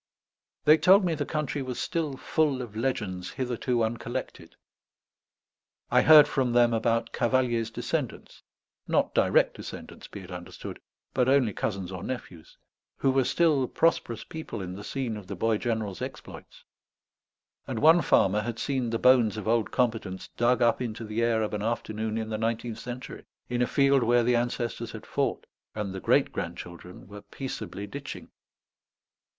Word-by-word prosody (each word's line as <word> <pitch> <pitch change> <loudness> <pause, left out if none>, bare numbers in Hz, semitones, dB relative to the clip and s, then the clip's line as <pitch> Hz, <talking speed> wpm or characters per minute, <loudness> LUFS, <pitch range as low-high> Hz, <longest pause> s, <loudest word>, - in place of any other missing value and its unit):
They 155 +1 +7
told 190 +1 +6
me 170 - +1
the 145 -2 -3
country 150 -2 -2
was 130 -2 -4
still 155 -5 -2
full 145 -5 0
of 110 -3 -10
legends 105 -7 -2
hitherto 125 -2 -1
uncollected; 120 +3 -4 1.4
I - - +5
heard 155 -2 +8
from 130 -3 0
them 120 -1 +4
about 115 0 0
Cavalier's 120 -2 +1
descendants 115 - -4 0.5
not - - +1
direct - - +3
descendants, - - -9
be 100 - -9
it 90 0 -11
understood, 90 -1 -8 0.3
but 130 -1 +2
only 130 -6 +3
cousins 95 -3 -3
or 95 -2 -6
nephews 95 -8 -7 0.4
who 135 - +2
were 135 0 +3
still 145 -2 +2
prosperous 120 -9 0
people 160 -8 -7
in 90 -2 -5
the 100 +2 -8
scene 125 -1 -3
of 100 -3 -10
the - - -5
boy 115 -2 +1
general's 110 -6 -2
exploits; - - -9 1.0
and - - -3
one 160 +3 +6
farmer 105 -7 +3
had 115 +1 -4
seen 130 -2 -1
the 115 - 0
bones 120 -3 +4
of 105 - -5
old 115 -1 +2
combatants 110 -7 -1
dug 120 +1 +2
up 120 +1 +3
into 115 -2 -4
the 110 +2 -2
air 115 -1 +2
of 105 - -3
an 105 - -2
afternoon 110 -1 -2
in 110 -1 -3
the 110 -1 -3
nineteenth 115 0 -2
century, 125 +1 -7 0.3
in 120 0 -1
a 125 - +3
field 140 -1 +3
where 120 0 +3
the 120 +1 +3
ancestors 120 0 -2
had - - -9
fought, - - -1 0.3
and 105 -3 -3
the 95 - -5
great - - +2
grandchildren 85 +1 -7
were 105 +1 -10
peaceably 125 -6 -6
ditching. 140 +7 -8
120 Hz, 165 wpm, -27 LUFS, 110-130 Hz, 1.4 s, heard